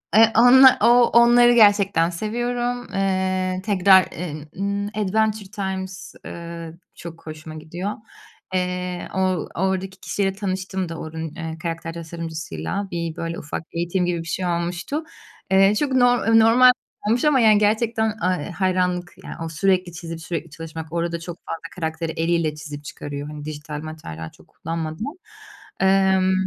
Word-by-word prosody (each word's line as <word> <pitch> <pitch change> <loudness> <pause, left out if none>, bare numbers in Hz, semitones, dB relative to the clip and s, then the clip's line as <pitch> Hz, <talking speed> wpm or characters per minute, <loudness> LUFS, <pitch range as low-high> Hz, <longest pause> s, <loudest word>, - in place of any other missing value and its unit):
Eee, 225 +1 +7
onlar, 260 +2 +8
o - - +5 0.3
onları 240 +1 +6
gerçekten 200 -6 +5
seviyorum. 240 +5 -2
Eee, 185 -1 0
tekrar, 190 -2 +6
eee, 155 -3 -6
ımm, 200 +1 -1
Adventure 210 0 -1
Times, 190 -2 -5
eee, 170 -1 -7 0.2
çok 165 -1 -11
hoşuma 155 0 -8
gidiyor. 170 +6 -5 0.6
Eee, 180 -1 -2
o 190 - 0 0.4
oradaki 190 +1 -2
kişiyle 195 -1 -1
tanıştım 190 -2 -3
da 165 - -6
oranın, 160 0 -6
eee, 160 -1 -5
karakter 165 -1 -4
tasarımcısıyla, 165 - -5
bir, 170 -2 -3
böyle, 165 0 -4
ufak 150 - -5
eğitim 175 +2 0
gibi 175 -1 -1
bir 165 - -7
şey 180 +4 -2
olmuştu. 175 - -2 0.5
Eee, 195 +2 +5
çok 280 +5 0
nor 245 -2 +3
eee, 225 0 +6
normal 240 +3 +7 0.4
olmuş 240 +6 +2
ama 295 -3 +4
yani 215 -3 +6
gerçekten, 220 +1 +1
aaa, 180 -2 +1
iii, - - -6
hayranlık 180 -1 0
yani - - -7
o, - - -4
sürekli 180 +2 +1
çizip, 165 -1 -7
sürekli 165 -1 -4
çalışmak, 160 0 -8
orada 170 0 -1
çok 170 +1 -8
fazla 165 - -5
karakteri 160 -1 -3
eliyle 165 -2 0
çizip 150 -1 -8
çıkarıyor, 145 0 -6
hani, 150 0 -8
dijital 150 0 -6
materyal 80 - -7
çok - - -21
kullanmadan. 165 - -5 0.7
Emm, 190 -1 +4
180 Hz, 145 wpm, -22 LUFS, 165-205 Hz, 0.7 s, onlar